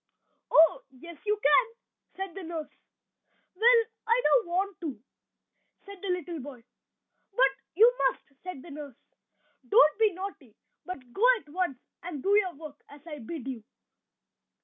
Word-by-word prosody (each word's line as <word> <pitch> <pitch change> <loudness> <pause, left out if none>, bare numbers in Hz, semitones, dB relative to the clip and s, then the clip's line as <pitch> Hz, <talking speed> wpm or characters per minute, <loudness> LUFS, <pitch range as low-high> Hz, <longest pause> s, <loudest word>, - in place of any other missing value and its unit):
"Oh! 320 -1 +5
yes, 290 +5 -13
you 420 0 +1
can," 295 - +5 0.5
said 385 -2 -5
the 390 - -7
nurse. 330 -3 -6 0.8
"Well, 460 +4 +5 0.2
I 460 +2 +4
don't 475 -7 +3
want 375 +2 -2
to," 285 -10 -5 0.9
said 400 -2 -11
the 400 - -5
little 350 -2 -3
boy. 260 -3 -10 0.7
"But - - +4 0.2
you 465 +6 +6
must!" 275 - -14
said 365 -8 -8
the 340 - -12
nurse. 285 -4 -9 0.7
"Don't 300 - +5
be 435 -2 +4
naughty, 350 - -8 0.3
but 260 -9 -8
go 420 - -2 0.2
at 300 - -22
once 345 -4 -2 0.2
and 335 -6 -7
do 400 +1 +3
your 380 -5 +2
work 295 -1 -11
as 285 +1 -15
I 300 -3 -8
bid 270 +2 -7
you!" 250 -5 -5
340 Hz, 150 wpm, -28 LUFS, 285-390 Hz, 0.9 s, you